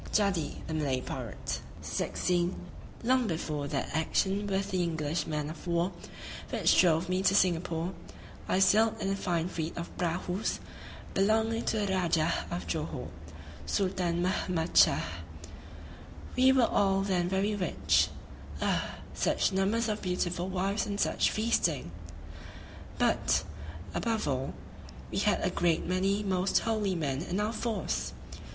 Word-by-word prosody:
JADDI 200 Hz, -6 st, +1 dB
THE 160 Hz, -, -4 dB
MALAY 140 Hz, -5 st, 0 dB
PIRATE 125 Hz, -4 st, -5 dB, 1.4 s
Long 255 Hz, 0 st, +3 dB
before 155 Hz, -4 st, -2 dB
that -, -, -2 dB
action 195 Hz, +5 st, +1 dB
with 195 Hz, 0 st, -1 dB
the 185 Hz, -1 st, +1 dB
English 160 Hz, -2 st, -1 dB
man 150 Hz, -2 st, -2 dB
of 160 Hz, +3 st, -10 dB
war 170 Hz, +2 st, +1 dB, 0.6 s
which -, -, +4 dB
drove 170 Hz, -1 st, +3 dB
me 185 Hz, +1 st, 0 dB
to 195 Hz, 0 st, +3 dB
Singapore, 175 Hz, -1 st, +1 dB, 0.6 s
I -, -, +3 dB
sailed 210 Hz, +4 st, +4 dB
in 195 Hz, -, -1 dB
a -, -, +1 dB
fine 175 Hz, -4 st, -1 dB
fleet 165 Hz, -2 st, -4 dB
of 170 Hz, -, -6 dB
prahus 180 Hz, +3 st, -1 dB, 0.6 s
belonging 220 Hz, +3 st, +2 dB
to 220 Hz, -, +1 dB
the 200 Hz, -2 st, 0 dB
Rajah 170 Hz, -3 st, +2 dB, 0.2 s
of 90 Hz, -1 st, -4 dB
Johore 80 Hz, -, -3 dB, 0.6 s
[Sultân 180 Hz, -, 0 dB
Mahmâd 180 Hz, -3 st, -1 dB
Shâh]. -, -, +6 dB, 1.3 s
We 260 Hz, +1 st, +6 dB
were 260 Hz, -3 st, +5 dB
all 195 Hz, -3 st, +2 dB
then 180 Hz, -3 st, 0 dB
very 195 Hz, +3 st, +1 dB
rich 195 Hz, -3 st, +2 dB, 0.5 s
ah! -, -, 0 dB, 0.2 s
such -, -, +1 dB
numbers 205 Hz, +5 st, +1 dB
of 215 Hz, -1 st, -2 dB
beautiful 180 Hz, 0 st, -1 dB
wives 195 Hz, +3 st, 0 dB
and 200 Hz, -1 st, -3 dB
such -, -, +2 dB
feasting! 175 Hz, -, 0 dB, 1.1 s
but, -, -, +2 dB, 0.5 s
above 225 Hz, -, -1 dB
all, 135 Hz, -1 st, -2 dB, 0.6 s
we -, -, -1 dB
had -, -, +2 dB
a -, -, +1 dB
great 170 Hz, -2 st, +1 dB
many 195 Hz, +3 st, +1 dB
most 190 Hz, -1 st, +1 dB
holy 215 Hz, -4 st, 0 dB
men 140 Hz, -4 st, -1 dB
in 180 Hz, +3 st, -2 dB
our 210 Hz, +2 st, 0 dB
force! 225 Hz, 0 st, -2 dB
185 Hz, 135 wpm, -30 LUFS, 165-205 Hz, 1.4 s, Shâh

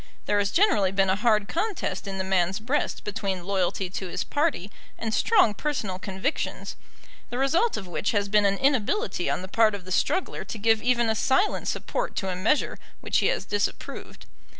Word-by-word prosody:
There 205 Hz, -, +2 dB
has 200 Hz, -1 st, +1 dB
generally 330 Hz, -, +3 dB
been 195 Hz, -1 st, +2 dB
a -, -, +2 dB
hard 210 Hz, -1 st, +2 dB
contest 380 Hz, -, -2 dB
in 195 Hz, -1 st, -4 dB
the 190 Hz, -, -1 dB
man's 190 Hz, 0 st, +1 dB
breast 255 Hz, +7 st, -1 dB
between 195 Hz, -3 st, -3 dB
loyalty 190 Hz, 0 st, -1 dB
to 190 Hz, 0 st, -4 dB
his -, -, -3 dB
party 290 Hz, -, -1 dB, 0.3 s
and 225 Hz, -1 st, -3 dB
strong 380 Hz, -, +4 dB
personal 210 Hz, -7 st, -3 dB
convictions, 190 Hz, +10 st, -3 dB, 0.5 s
the 245 Hz, -, -4 dB
result 330 Hz, -, +2 dB
of 195 Hz, -, -6 dB
which 180 Hz, +3 st, -2 dB
has 205 Hz, -2 st, +1 dB
been 205 Hz, 0 st, +4 dB
an 200 Hz, 0 st, +1 dB
inability 275 Hz, -, +1 dB
on -, -, -1 dB
the -, -, -6 dB
part 215 Hz, +1 st, +3 dB
of 190 Hz, -3 st, -9 dB
the 185 Hz, -, -9 dB
struggler 370 Hz, -, 0 dB
to -, -, -7 dB
give 225 Hz, +1 st, +3 dB
even 240 Hz, -1 st, +2 dB
a 220 Hz, -, +2 dB
silent 275 Hz, -, +1 dB
support -, -, -2 dB
to 190 Hz, -, -2 dB
a 185 Hz, -, -2 dB
measure 215 Hz, +12 st, +1 dB, 0.2 s
which -, -, +1 dB
he -, -, +2 dB
has -, -, 0 dB
disapproved. 205 Hz, -1 st, -4 dB
210 Hz, 195 wpm, -26 LUFS, 195-270 Hz, 0.5 s, strong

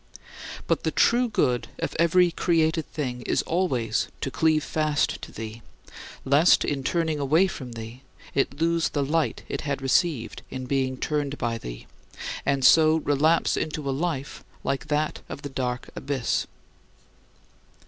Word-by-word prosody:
But -, -, +1 dB
the -, -, 0 dB
true 245 Hz, +1 st, +3 dB
good 125 Hz, -, +1 dB
of -, -, -3 dB
every 175 Hz, +1 st, +4 dB
created 160 Hz, -2 st, +1 dB
thing 125 Hz, -5 st, -3 dB
is -, -, 0 dB
always 130 Hz, -11 st, 0 dB
to 135 Hz, -, -2 dB
cleave 155 Hz, +5 st, +2 dB
fast 155 Hz, -2 st, 0 dB
to -, -, -9 dB
thee, 110 Hz, +1 st, -7 dB, 0.6 s
lest, 145 Hz, +6 st, +5 dB
in 140 Hz, -2 st, -2 dB
turning 160 Hz, 0 st, 0 dB
away 155 Hz, +7 st, +4 dB
from 130 Hz, -10 st, -6 dB
thee, 115 Hz, +2 st, -8 dB, 0.3 s
it 140 Hz, +1 st, 0 dB
lose 165 Hz, 0 st, +2 dB
the 145 Hz, -2 st, -1 dB
light 160 Hz, +3 st, 0 dB
it -, -, -3 dB
had 140 Hz, -2 st, -2 dB
received 135 Hz, -1 st, 0 dB
in 130 Hz, 0 st, -5 dB
being 130 Hz, -1 st, 0 dB
turned 145 Hz, 0 st, -2 dB
by 115 Hz, -1 st, -2 dB
thee, -, -, -8 dB, 0.6 s
and 140 Hz, -2 st, +2 dB
so 155 Hz, +3 st, +7 dB
relapse 155 Hz, +1 st, +2 dB
into 155 Hz, -2 st, -3 dB
a -, -, +1 dB
life 145 Hz, -2 st, -3 dB, 0.2 s
like 135 Hz, +2 st, -2 dB
that 150 Hz, +1 st, 0 dB
of 140 Hz, -, -7 dB
the 145 Hz, -, -4 dB
dark 125 Hz, -2 st, -3 dB
abyss. 135 Hz, -3 st, -1 dB
145 Hz, 150 wpm, -25 LUFS, 130-160 Hz, 0.6 s, so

